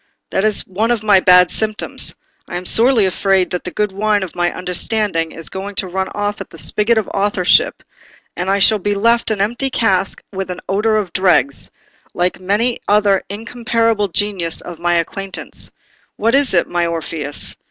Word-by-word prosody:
That 190 - 0
is 215 -1 +3
one 210 +5 -1
of 235 -3 0
my 205 -3 +5
bad 180 -1 +5
symptoms: 215 -1 -2 0.3
I 175 - -4
am 180 - -7
sorely 230 +1 +4
afraid 190 0 +1
that 180 - -3
the - - -4
good 210 +2 -1
wine 205 +1 0
of 185 - -7
my 175 0 0
understanding 180 -2 -1
is 165 - -6
going 195 +1 -6
to 195 - -1
run 190 +1 -2
off 205 0 -2
at - - -8
the - - -13
spigot 220 +2 +2
of 220 - 0
authorship, 200 -2 +2 0.5
and 180 +2 -3
I 195 - +3
shall 210 +2 +4
be 205 +2 -1
left 230 +3 +2
an 215 -2 -1
empty 240 +6 0
cask 195 -6 +1
with 190 -1 -4
an 180 - -5
odour 215 +3 +1
of 200 -4 -3
dregs, 170 -8 +2 0.5
like 180 +1 0
many 210 +6 0
another 205 -2 +3
incomparable 230 0 -1
genius 190 -3 -1
of 175 -2 -9
my 175 0 +1
acquaintance. 190 +3 -3 0.5
What 225 +2 +1
is 275 -7 +3
it, 170 - +2
my 175 -1 0
Orpheus?" 160 -3 -4
195 Hz, 185 wpm, -17 LUFS, 180-215 Hz, 0.5 s, my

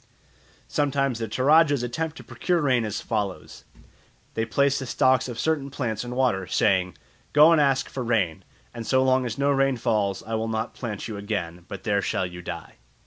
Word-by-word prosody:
Sometimes 140 -4 0
the 115 - -2
Toradjas 145 +4 +4
attempt 155 +6 -3
to - - -10
procure 175 -1 -1
rain 130 -6 +2
as 105 - -3
follows. 105 -5 -4 0.7
They 115 - -1
place 140 +4 +2
the 135 - -5
stalks 130 +1 +2
of 120 - -6
certain 155 -3 0
plants 125 -6 -3
in 125 0 -6
water, 120 -8 +1
saying, 90 -4 +1 0.4
"Go 150 +3 +7
and 165 -2 +5
ask 135 -2 +2
for 130 - -5
rain, 110 -9 0 0.3
and 115 -1 -7
so 130 0 +3
long 130 -1 +2
as 115 - -5
no 140 +1 +2
rain 135 -1 +2
falls 105 -5 0
I 115 - -6
will 110 0 -1
not 110 0 -2
plant 110 -5 -5
you 110 -3 -5
again, 90 -5 -4
but 95 -2 -8
there 100 -2 +1
shall 95 - -1
you 90 0 -8
die." - - -8
120 Hz, 195 wpm, -25 LUFS, 105-135 Hz, 0.7 s, Go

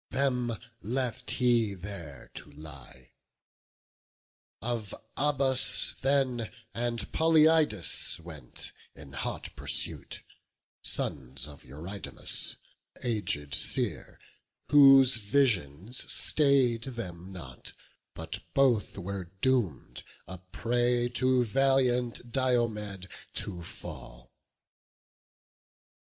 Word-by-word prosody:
Them 125 -4 -1 0.2
left 125 +2 -3
he 120 -5 +2
there 90 -7 -9
to - - -9
lie; 70 -4 -13 1.5
of 115 -3 -4 0.2
Abas 135 -2 +4
then 130 -4 0 0.2
And 120 -2 -3
Polyeidus 155 - +3
went 80 -7 -4 0.2
in - - -13
hot - - -5
pursuit, - - -1 0.6
Sons 65 0 -3
of 75 -1 -13
Eurydamas, 85 +9 -6 0.4
an - - -20
aged 100 - -2
seer, 80 - -1 0.5
Whose 135 -3 +8
visions 105 - +1
stay'd 135 -6 +4
them 95 -8 -7
not; 90 -3 -9 0.4
but 80 0 -5 0.2
both 130 -8 +2
were 100 0 -5 0.2
doom'd 120 - 0 0.3
A 95 -1 -8
prey 120 +6 0
to 130 +1 +2
valiant 125 -1 +1
Diomed 110 -7 -1 0.3
to 90 -4 -2
fall. - - -10
115 Hz, 85 wpm, -29 LUFS, 90-130 Hz, 1.5 s, Whose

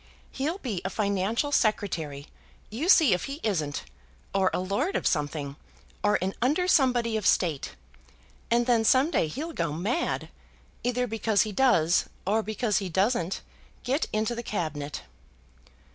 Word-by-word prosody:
He'll 305 +7 -2
be 230 - -4
a 190 - -2
financial 200 +7 0
Secretary; 165 - 0 0.5
you 280 - -2
see 320 - +7
if 180 - -1
he 275 +2 -6
isn't; 155 -9 -1 0.5
or 190 -1 +3
a - - -1
lord 200 - -1
of - - -1
something, 145 -2 -1 0.5
or 210 0 +4
an 190 +1 -1
under 300 +9 +2
somebody 245 -8 +3
of 215 - 0
State; 155 - +1 0.7
and 235 +1 +3
then 235 -2 +3
some 260 +7 +4
day 165 - +2
he'll 310 - -5
go - - -1
mad, 205 - -1 0.5
either 250 0 0
because 220 -3 +1
he 215 - -4
does 190 -8 +3 0.2
or 215 +4 +2
because 215 0 0
he 195 -2 -4
doesn't 190 0 0 0.4
get 270 +5 0
into 215 +2 0
the 235 - -4
Cabinet." 155 -9 -4
215 Hz, 150 wpm, -27 LUFS, 180-250 Hz, 0.7 s, see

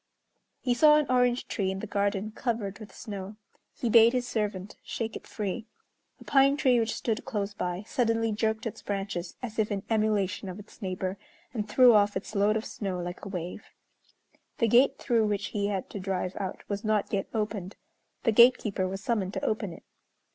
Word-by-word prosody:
He 250 - +1
saw 300 +5 +6
an 300 - +2
orange 250 -1 +2
tree 195 -3 -1
in 190 - -2
the 195 - -5
garden 200 0 -1
covered 220 -4 -3
with 215 -2 -10
snow. 200 -2 -7 0.4
He 240 - -2
bade 230 +1 +7
his 250 -1 0
servant 205 -4 -3
shake 225 -1 -4
it - - -8
free. 215 +2 -4 0.5
A - - -12
pine 275 0 +4
tree 255 -5 +4
which 225 -1 0
stood 225 -2 -2
close 205 -2 -3
by 180 0 -3
suddenly 225 -1 +1
jerked 220 +1 -1
its 225 - -5
branches 195 -3 -4
as 230 -2 -5
if 215 0 +1
in 200 -1 -2
emulation 210 -3 +1
of 180 - -7
its 210 +3 -14
neighbor, 185 0 -3 0.3
and 210 -3 -3
threw 250 +2 +7
off 205 -1 +4
its - - -7
load 210 +1 +3
of 220 - -4
snow 190 -4 -4
like 175 0 -6
a - - -5
wave. 180 -2 -5 0.9
The 230 - +2
gate 245 +5 +5
through 230 -4 +2
which 205 -1 -1
he 200 -1 -1
had 195 -2 -2
to 200 - -5
drive 185 -1 -2
out 190 -2 -5
was 200 +1 -3
not 215 -1 0
yet 195 -1 0
opened. 210 -4 -3 0.5
The - - +3
gatekeeper 215 -4 +5
was 195 +1 -5
summoned 205 -5 -1
to - - -2
open 215 -3 -1
it. - - -12
210 Hz, 195 wpm, -28 LUFS, 195-230 Hz, 0.9 s, bade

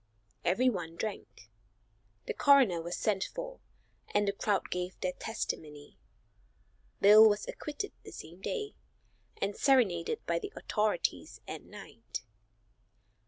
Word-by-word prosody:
Everyone 180 -5 +1
drank. 170 - -6 0.7
The - - -2
coroner 260 - +5
was 170 +2 -4
sent 195 -3 +1
for - - -6 0.6
and 205 0 +3
the - - +3
crowd 200 0 -1
gave 180 +1 -3
their 185 - 0
testimony. 150 -8 -5 1.0
Bill 215 +2 +9
was 205 0 -1
acquitted 300 +7 -5
the - - -11
same 170 +4 -10
day, 425 - -3 0.7
and 200 +1 -1
serenaded 220 -12 +2
by 170 0 0
the - - -6
authorities 210 -4 -1
at - - -6
night. 115 +2 -9
200 Hz, 120 wpm, -31 LUFS, 170-230 Hz, 1.0 s, Bill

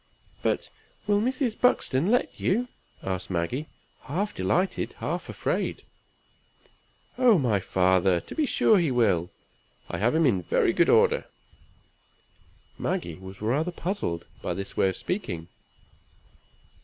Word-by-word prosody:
"But - - 0 0.4
will 205 0 +2
Mr. 255 -1 -1
Buxton 175 - +2
let 245 +2 +2
you?" 240 +7 +1 0.3
asked 95 -1 -3
Maggie, 95 - -2 0.4
half 200 +9 -2
delighted 185 +2 0
half - - -4
afraid. - - -2 1.4
"Oh, 245 -5 +6
my 120 -9 +2
father! 95 -1 +2
to - - -10
be 305 -3 0
sure 215 -5 +4
he 170 -4 +1
will. 100 -9 +2 0.6
I - - -3
have 120 +8 +2
him 165 0 +4
in 100 -9 +3
very - - +2
good - - +3
order." - - +4 1.5
Maggie 85 -1 -2
was 95 +4 -10
rather 145 +10 +1
puzzled 175 - -3 0.2
by - - -2
this 100 0 -6
way 95 - +3
of 95 - -4
speaking. 90 - -4
130 Hz, 130 wpm, -27 LUFS, -, 1.5 s, Oh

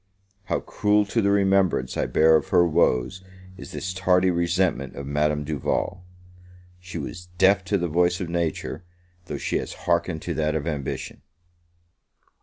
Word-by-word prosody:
How - - -1
cruel 105 0 +1
to 115 +3 0
the 100 - +2
remembrance 95 -8 +2
I - - 0
bear 80 +1 +5
of 80 - +1
her 85 - +4
woes 85 +1 +1 0.3
is 95 - -10
this 95 +1 -4
tardy 90 0 +3
resentment 85 -5 0
of 70 - -6
Madame 75 +1 0
Duval! 80 +5 -2 0.8
She 90 -1 -8
was 85 +4 -7
deaf 95 +1 +4
to 100 +2 +1
the 90 -1 -1
voice 90 +2 +1
of 90 - -3
Nature, 85 0 -3 0.4
though - - -5
she - - -1
has - - -5
hearkened 85 -1 0
to - - -3
that 75 0 0
of 75 -2 -2
Ambition. 75 -5 -4
85 Hz, 160 wpm, -24 LUFS, 80-95 Hz, 0.8 s, bear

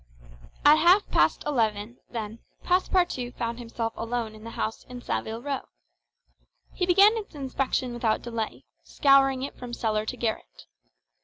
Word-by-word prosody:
At 300 +1 +8
half 360 +5 +5
past - - +3
eleven, 225 -4 -1
then, 225 -1 -5 0.2
Passepartout 355 -8 +1
found 235 0 -3
himself 230 -1 -4
alone 230 -1 -3
in 215 0 -13
the 230 - -7
house 220 -1 -4
in 250 0 -9
Saville 230 -1 -4
Row. 280 -1 -3 1.1
He 360 - -1
began 395 +5 +6
its 420 -7 -7
inspection 265 -2 -2
without 230 -2 0
delay, 230 -2 -4 0.2
scouring 270 -2 +3
it 275 - -5
from 245 -1 -7
cellar 215 -2 -1
to 250 - -4
garret. - - -4
245 Hz, 145 wpm, -26 LUFS, 225-280 Hz, 1.1 s, At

